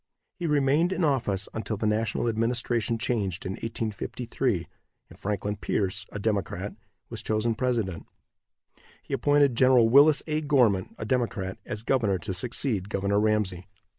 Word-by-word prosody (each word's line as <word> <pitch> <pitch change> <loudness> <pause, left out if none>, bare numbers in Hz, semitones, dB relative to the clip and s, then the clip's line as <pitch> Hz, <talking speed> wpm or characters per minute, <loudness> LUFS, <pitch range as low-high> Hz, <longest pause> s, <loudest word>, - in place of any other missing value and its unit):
He 175 - -4
remained 150 +4 +2
in 185 - -1
office 120 - +1
until 110 -1 -3
the 110 - -2
national 110 +2 0
administration 115 0 0
changed 105 -6 -2
in 95 - -2
1853, 115 -1 -3 0.4
and - - -15
Franklin 105 0 -2
Pierce, 100 0 -1
a - - -5
Democrat, 100 -2 -2 0.4
was 115 - -3
chosen 110 +2 0
president. 110 -8 -2 1.0
He - - -7
appointed 145 +1 +3
Gen. 120 -2 +5
Willis 145 +3 +6
A. 155 -1 -1
Gorman, 125 -11 +2
a 110 - -5
Democrat, 110 -6 -1
as 105 +1 -5
governor 110 -7 +1
to 95 +1 -4
succeed 105 0 -1
Governor 100 0 +1
Ramsey. 105 -4 0
110 Hz, 140 wpm, -27 LUFS, 100-125 Hz, 1.0 s, Willis